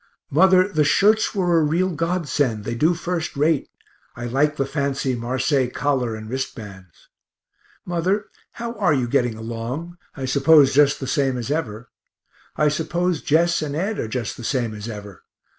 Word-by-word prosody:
Mother, 185 +4 +5
the 155 -7 +1
shirts 210 +9 +3
were 175 -4 +2
a - - +2
real 170 +5 +1
godsend, 150 - -1
they - - -2
do 155 +9 +2
first 170 -3 -3
rate; 150 0 +1 0.5
I 120 - -6
like 140 +5 +1
the 135 - 0
fancy 135 -2 -1
marseilles 130 +2 0
collar 130 -6 0
and 110 0 -8
wrist 130 +3 -4
bands. 95 -6 -12 0.8
Mother, 180 +4 0 0.3
how 235 0 -5
are 180 -7 +3
you 125 -3 0
getting 120 -1 +1
along 120 +10 -6 0.2
I 135 - -3
suppose 140 +1 +5
just 145 0 +4
the 135 - -4
same 135 -1 0
as 120 +3 -4
ever. 125 -7 -4 0.6
I 150 - +2
suppose 165 +3 -1
Jess 165 +2 +2
and 145 -2 -3
Ed 195 +7 -2
are - - -2
just 115 0 -4
the 120 - -9
same 120 -2 -1
as 105 +1 -7
ever. 105 -4 -9
145 Hz, 170 wpm, -22 LUFS, 120-170 Hz, 0.8 s, Mother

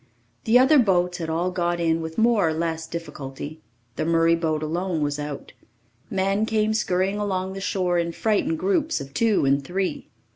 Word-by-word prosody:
The 225 +2 +5
other 270 +4 +6
boats 180 -5 +2
had 165 -1 -4
all 170 +3 0
got 175 -1 -1
in 165 -1 +1
with 160 0 -6
more 225 -5 +3
or - - -1
less 160 0 -2
difficulty. 155 -2 -7 0.4
The - - 0
Murray 165 +1 +3
boat 160 -2 0
alone 170 +1 -2
was 145 0 -1
out. 145 -1 -6 0.6
Men 195 +2 0
came 220 -1 +1
scurrying 195 -1 0
along 190 -2 -2
the 195 - -6
shore 180 -2 0
in 170 0 -1
frightened 225 - 0
groups 335 - 0
of 140 0 -9
two 215 -2 +2
and 140 +1 +2
three. 185 +5 -3
180 Hz, 180 wpm, -24 LUFS, 160-205 Hz, 0.6 s, other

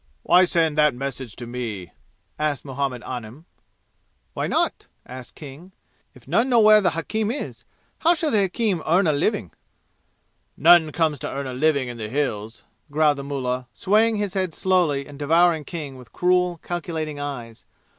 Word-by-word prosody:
"Why 180 +1 +5
send 160 -3 +1
that 150 -4 +4
message 130 -3 -5
to 120 - -7
me?" 115 -7 -5 0.5
asked 150 -3 -1
Muhammad 135 -2 -3
Anim. 125 +5 -7 0.9
"Why - - -2
not?" - - -1 0.2
asked 130 0 -10
King. 155 +6 -11 0.4
"If - - -18
none 245 +3 +2
know 240 -2 +5
where 215 -1 +7
the 175 -5 +1
hakim 215 +5 -2
is, 270 +5 -5 0.3
how 340 +2 +4
shall 315 -2 -1
the 210 - +3
hakim 195 -2 0
earn 180 +5 +3
a 155 - +3
living?" 145 - -1 1.1
"None 165 -1 +6
comes 155 -3 0
to - - -4
earn 140 +1 -4
a 130 - -5
living 140 0 +1
in 120 -1 -7
the 105 -1 -5
Hills," 115 -5 -3 0.3
growled 150 -1 +2
the - - -5
mullah, 130 -3 -3
swaying 220 +3 +2
his 205 -2 -2
head 185 -4 -2
slowly 175 -7 +1
and 145 0 -12
devouring 160 +1 +3
King 150 -6 -6
with 125 -2 -14
cruel 180 -1 +1
calculating 160 -4 -4
eyes. 120 -6 -7
150 Hz, 165 wpm, -23 LUFS, 130-180 Hz, 1.1 s, where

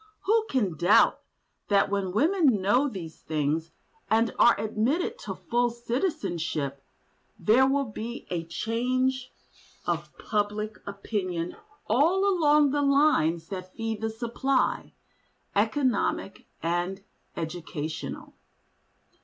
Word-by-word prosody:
Who 445 +2 +2
can 205 -11 0
doubt 175 +5 +5 0.5
that 200 -1 +3
when 195 -2 -1
women 315 - +3
know 245 +9 +3
these 170 -8 -8
things 155 +1 -1 0.4
and 225 +1 +2
are 240 - +6
admitted 260 - 0
to - - -6
full 240 0 0
citizenship, 175 - -2 0.5
there 255 +5 +4
will 275 +1 +1
be 230 +2 -6
a 170 -2 -1
change 255 +7 -1 0.5
of - - -3
public 210 0 -2
opinion 185 -4 -3 0.3
all 335 - +3
along 300 -6 +4
the 290 +1 +1
lines 275 - +3
that 185 -1 -7
feed 225 -2 -3
the 220 - 0
supply—economic 245 -1 -2 0.2
and 175 +3 -1 0.3
educational? 160 -1 -5
220 Hz, 105 wpm, -27 LUFS, 180-265 Hz, 0.5 s, are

